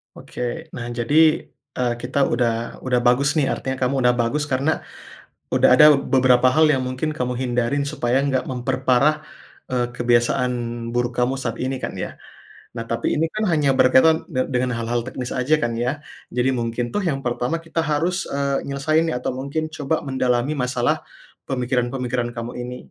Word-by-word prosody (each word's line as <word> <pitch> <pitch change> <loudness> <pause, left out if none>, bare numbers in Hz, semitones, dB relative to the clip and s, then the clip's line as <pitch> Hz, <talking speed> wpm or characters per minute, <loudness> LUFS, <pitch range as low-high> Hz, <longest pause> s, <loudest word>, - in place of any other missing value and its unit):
Oke - - -9 0.3
nah 120 - -5
jadi, 120 +5 -2 0.6
eee, 125 -1 0
kita 125 +3 -4 0.2
udah 115 -1 -1
udah 125 -1 +2
bagus 130 +4 +3
nih, 150 -4 +1
artinya 130 0 -4
kamu 130 +2 +1
udah 125 - +5
bagus 145 +6 -1
karena 140 +2 0 0.8
udah - - +4
ada 140 +4 +8 0.3
beberapa 130 -1 +5
hal 155 +2 +5
yang 130 -3 +1
mungkin 130 +4 -2
kamu 125 0 -1
hindarin 125 +2 0
supaya 135 -3 0
nggak 135 -2 0
memperparah, 130 +4 +1 0.5
eee, 120 -1 0
kebiasaan 120 +1 +1 0.4
buruk 120 0 -1
kamu 125 +1 +2
saat 115 -2 -3
ini 130 0 -3
kan - - -5
ya. - - -4 0.6
Nah 115 - -3
tapi 115 0 -1
ini 160 - +2
kan 215 -1 -1
hanya 150 -5 +2
berkaitan 130 +5 +4
de 130 -5 0
dengan 125 -1 0
hal-hal 115 +1 -1
teknis 125 -1 -5
aja 130 +5 +2
kan 120 -6 -1
ya. 125 +6 -2 0.3
Jadi 130 +2 +2
mungkin 120 -1 -2
tuh 205 - 0
yang 135 -4 -3
pertama 125 +5 -1
kita 165 0 -2
harus, 165 +4 -1
eee, 140 0 -1
nyelesain 155 +4 +1
nih 140 - -1
atau 125 - -2
mungkin 140 +5 -4
coba 155 +1 -2
mendalami 130 0 0
masalah 125 -3 0 0.5
pemikiran-pemikiran 125 -1 -1
kamu 115 +1 -5
ini. 125 +1 -5
130 Hz, 170 wpm, -22 LUFS, 120-140 Hz, 0.8 s, ada